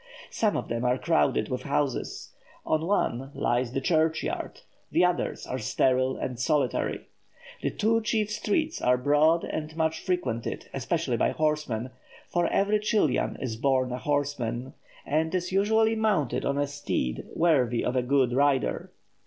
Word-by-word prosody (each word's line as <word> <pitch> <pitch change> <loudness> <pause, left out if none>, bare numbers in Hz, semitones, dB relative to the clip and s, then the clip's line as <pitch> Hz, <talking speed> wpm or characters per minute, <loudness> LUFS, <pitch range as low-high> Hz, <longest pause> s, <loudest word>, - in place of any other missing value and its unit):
Some 215 -2 +1
of - - -4
them 115 +1 -2
are 125 +1 +2
crowded 165 +1 +1
with 125 -1 -2
houses; 140 -2 -2 0.4
on 155 +1 0
one 135 -9 0
lies 120 0 0
the 135 - -2
church 160 +1 +2
yard; - - -4 0.3
the - - +4
others - - -1
are - - -4
sterile 130 0 +1
and 125 -2 -4
solitary. 135 -2 0 0.6
The - - 0
two 225 +2 +1
chief 215 -1 0
streets 265 +10 -1
are 125 0 +3
broad 150 +5 +3
and 155 0 -5
much 160 -1 0
frequented, 130 -11 -2
especially - - -1
by - - +2
horsemen, 150 -6 -1 0.4
for 175 -1 +2
every 205 +4 +2
Chilian 210 - +1
is 115 -4 -4
born 130 0 +1
a 125 - -3
horseman, 140 -4 -2 0.3
and 160 +4 0
is 180 0 -2
usually 220 +3 +3
mounted 210 - 0
on 140 0 0
a 145 - +2
steed 140 - -3
worthy 130 -8 +2
of 125 - -1
a 130 - +3
good 130 -1 +2
rider. 140 0 +1
145 Hz, 155 wpm, -27 LUFS, 125-175 Hz, 0.6 s, the